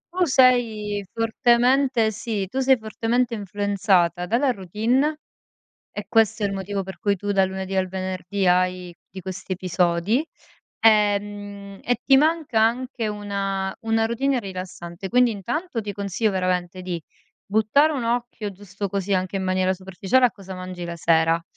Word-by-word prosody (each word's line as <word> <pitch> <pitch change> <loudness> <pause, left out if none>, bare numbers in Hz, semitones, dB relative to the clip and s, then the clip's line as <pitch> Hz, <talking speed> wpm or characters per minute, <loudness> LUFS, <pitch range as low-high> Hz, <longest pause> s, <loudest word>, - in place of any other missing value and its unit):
Tu 365 -1 +3
sei 230 -7 +3
fortemente 240 +1 +2
sì, 215 -2 -3
tu 260 +8 -3
sei 265 -1 +4
fortemente 225 +2 -1
influenzata 200 -4 +1
dalla 255 +5 +2
routine, 235 - 0 0.7
e 205 - -6
questo 220 -1 +2
è - - +3
il 200 - -1
motivo 195 +1 -3
per 190 0 -9
cui 205 -2 +1
tu 205 +2 -3
dal 195 -1 +3
lunedì 190 0 -4
al 185 -1 +1
venerdì 185 +1 -3
hai 180 -1 +1
di 190 - -9
questi 185 +1 -5
episodi, 180 - +1 0.6
ehm, 205 -2 +1
e 245 - +1
ti 270 -1 +6
manca 305 -6 +2
anche 235 0 0
una 195 -2 -3
una 225 0 +2
routine 255 +4 0
rilassante. 185 -2 -7
Quindi 245 +2 +4
intanto 230 - -3
ti 205 -1 -5
consiglio 200 +2 -1
veramente 185 -1 -1
di 175 -3 -4 0.4
buttare 220 +9 +3
un 265 -5 -2
occhio 235 -3 -2
giusto 200 +1 -6
così 200 +1 -1
anche 185 +1 -1
in 190 - -2
maniera 185 0 +1
superficiale 190 +7 +1
a - - -2
cosa 195 -4 -10
mangi 185 -1 -7
la 170 0 -5
sera. 165 0 +2
205 Hz, 155 wpm, -23 LUFS, 185-230 Hz, 0.7 s, ti